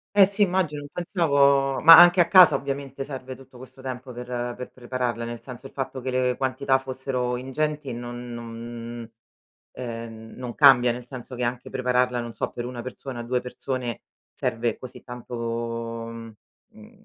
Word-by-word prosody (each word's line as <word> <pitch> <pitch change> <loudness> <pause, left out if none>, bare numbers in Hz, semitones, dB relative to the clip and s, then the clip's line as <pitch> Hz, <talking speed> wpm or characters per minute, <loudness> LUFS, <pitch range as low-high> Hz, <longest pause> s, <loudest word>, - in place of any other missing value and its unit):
Eh, 200 -2 +8
sì, 200 +1 +1
immagino 175 -6 0
non 145 - -10
pensavo 140 -6 +2
ma 165 +1 +11
anche 175 +1 +8
a 170 - +3
casa, 185 -1 +8
ovviamente, 140 -1 -3
serve 130 -2 -7
tutto 130 -1 -16
questo 130 +1 -13
tempo 130 0 -6
per 125 +1 -8 0.3
per 125 - -7
prepararla, 120 -2 -3
nel 120 0 -6
senso, 125 0 -10
il 135 - -9
fatto 135 -1 -4
che 130 +1 -3
le 125 -1 +1
quantità 135 0 +1
fossero 130 -2 -3
ingenti 145 +3 -2
e 120 - -4
non 120 0 -7
non 115 0 -8 0.6
ehm, 115 -2 -7
non 125 -2 -6
cambia, 125 -4 +6
nel 125 0 -8
senso 125 0 -9
che 125 0 -2
anche 125 +1 -3
prepararla, 125 -1 +1
non 120 -1 -7
so, - - -3
per 120 0 -5
1 120 -1 -6
persona, 130 -1 -7
2 125 +1 -1
persone, 125 -1 -5 0.3
serve 115 -2 -1
così 130 -1 -11
tanto, 125 -1 -9
mhmm, 115 -1 -5 0.4
mhmm, 215 0 -17
125 Hz, 175 wpm, -25 LUFS, 120-135 Hz, 0.6 s, ma